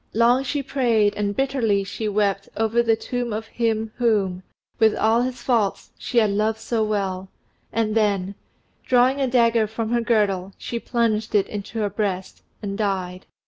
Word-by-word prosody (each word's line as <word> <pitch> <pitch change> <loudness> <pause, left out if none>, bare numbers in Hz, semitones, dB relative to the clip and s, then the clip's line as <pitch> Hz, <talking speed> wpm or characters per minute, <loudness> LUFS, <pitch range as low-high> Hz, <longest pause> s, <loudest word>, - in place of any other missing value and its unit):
Long 235 +3 +4
she 280 +1 -2
prayed 235 -7 +2
and 205 -1 -1
bitterly 240 -7 +1
she 215 +3 -4
wept 200 -1 0
over 225 +2 +2
the 230 -1 +3
tomb 245 +1 -4
of 215 +1 -3
him 225 -1 -1
whom, 205 -6 +1 0.4
with 220 -1 +4
all 225 +2 +3
his 250 0 -3
faults, 225 -6 0
she 245 - -4
had 215 -3 +4
loved 215 +2 0
so 225 0 -1
well, 195 -3 -2 0.4
and 220 -1 0
then, 200 -3 +1 0.5
drawing 255 +2 +3
a 265 - +2
dagger 230 -3 +3
from 220 +1 -4
her 240 0 +2
girdle, 200 -5 +1
she 235 - -4
plunged 225 -3 0
it 200 - +3
in 205 - -4
her 215 -2 0
breast 190 -2 -3 0.2
and 200 0 -4
died. 185 -3 -2
220 Hz, 170 wpm, -23 LUFS, 200-235 Hz, 0.5 s, Long